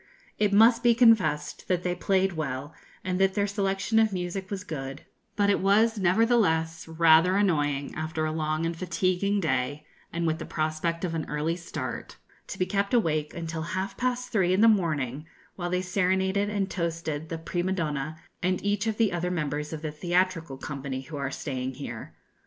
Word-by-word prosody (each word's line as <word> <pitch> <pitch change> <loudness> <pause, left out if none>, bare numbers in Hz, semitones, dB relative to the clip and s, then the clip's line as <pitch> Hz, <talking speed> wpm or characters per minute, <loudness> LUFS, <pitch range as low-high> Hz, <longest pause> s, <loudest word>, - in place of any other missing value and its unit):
It 210 -1 +3
must 230 +3 +6
be 240 -1 +4
confessed 185 -12 +3
that 180 -1 0
they 180 - 0
played 190 0 +1
well, 145 -2 -4 0.3
and 185 0 -1
that 195 0 +3
their 200 -1 +2
selection 200 +2 0
of 220 -1 +3
music 185 +1 -4
was 200 -2 -4
good, 135 -5 -6 0.3
but 205 -1 +3
it - - +2
was, 215 +3 +3
nevertheless, 180 -5 +2
rather 165 +2 +5
annoying, 145 -8 +1
after 160 -1 -2
a 155 - -1
long 155 0 -1
and 165 0 -2
fatiguing 185 +3 0
day, 145 -2 -1 0.3
and 170 0 -2
with 160 0 0
the - - -5
prospect 160 +2 -1
of 170 - -3
an 160 -2 -3
early 150 +3 -1
start, 170 -1 -6 0.3
to - - -6
be 185 - +1
kept 200 +3 0
awake 155 -9 +1
until 165 -1 -4
half 185 +4 -3
past 250 0 -2
three 185 -5 +2
in 195 - +2
the 230 - +7
morning, 155 - +1 0.3
while 175 -2 -3
they 180 +1 0
serenaded 190 +2 +1
and 200 -2 -1
toasted 165 -3 -3
the 165 - -3
prima 175 +3 -2
donna, 155 -3 -2 0.2
and 185 +1 0
each 205 +1 0
of 220 -1 -1
the 225 -5 +2
other 175 +1 -1
members 150 -3 -2
of 160 -1 -6
the 155 - -2
theatrical 175 -2 0
company 135 -1 -5
who 155 +3 -9
are 140 -1 -2
staying 130 -2 -4
here. 120 -4 -7
175 Hz, 185 wpm, -27 LUFS, 155-195 Hz, 0.3 s, the